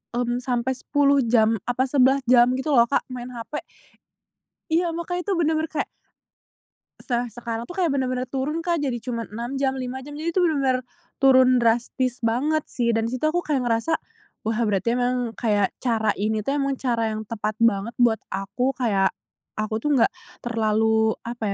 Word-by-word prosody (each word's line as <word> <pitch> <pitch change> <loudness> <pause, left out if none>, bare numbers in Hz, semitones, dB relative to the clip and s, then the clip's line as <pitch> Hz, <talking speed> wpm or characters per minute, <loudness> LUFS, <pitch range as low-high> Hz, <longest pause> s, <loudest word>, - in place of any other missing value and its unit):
hmm 240 0 0
sampai 250 0 -1
10 280 +2 +2
jam, 225 -1 +3
apa 245 +1 +1
11 270 0 +4
jam, 240 -1 +7
gitu 265 +4 -3
loh, 235 -4 +6
Kak, 280 - +1
main 245 -1 -6
HP. 240 +5 -5 1.1
Iya, 335 +1 +1
makanya 355 +1 -3
tuh 400 - +1
bener-bener 320 -2 +1
kayak 305 -2 -3 1.1
Setelah 245 -1 -2
sekarang 230 0 -5
aku 355 - -8
kayak 350 -3 +2
bener-bener 255 -2 -1
turun, 275 +5 -2
Kak, 340 -3 0
jadi 260 -4 -1
cuma 235 0 -4
6 235 +5 -5
jam, 270 -1 +1
5 255 +1 -5
jam, 290 +2 -9
jadi 335 +1 -3
tuh 370 - +3
bener-bener 270 -4 +1 0.4
turun 260 -2 +6
drastis 245 +2 +1
banget, 290 +7 +1
sih, 235 -2 -1
dan 225 0 +1
di 235 - -3
situ 255 - -3
aku 350 +2 -1
kayak 280 -4 0
ngerasa, 235 +7 +1 0.5
"Wah, 220 0 -1
berarti 210 +4 +1
emang 245 -1 -1
kayak 205 -4 +2
cara 225 -3 +1
ini 215 +1 0
tuh, 275 - -1
emang 275 -1 0
cara 230 -4 0
yang 215 - -4
tepat 215 -1 -3
banget 230 0 +2
buat 230 -2 +4
aku, 200 +7 -1
kayak 200 -7 +1 0.5
aku 215 0 -2
tuh 295 +6 0
enggak - - +4 0.3
terlalu 220 -1 +2
apa 235 0 -7
245 Hz, 175 wpm, -24 LUFS, 230-275 Hz, 1.1 s, jam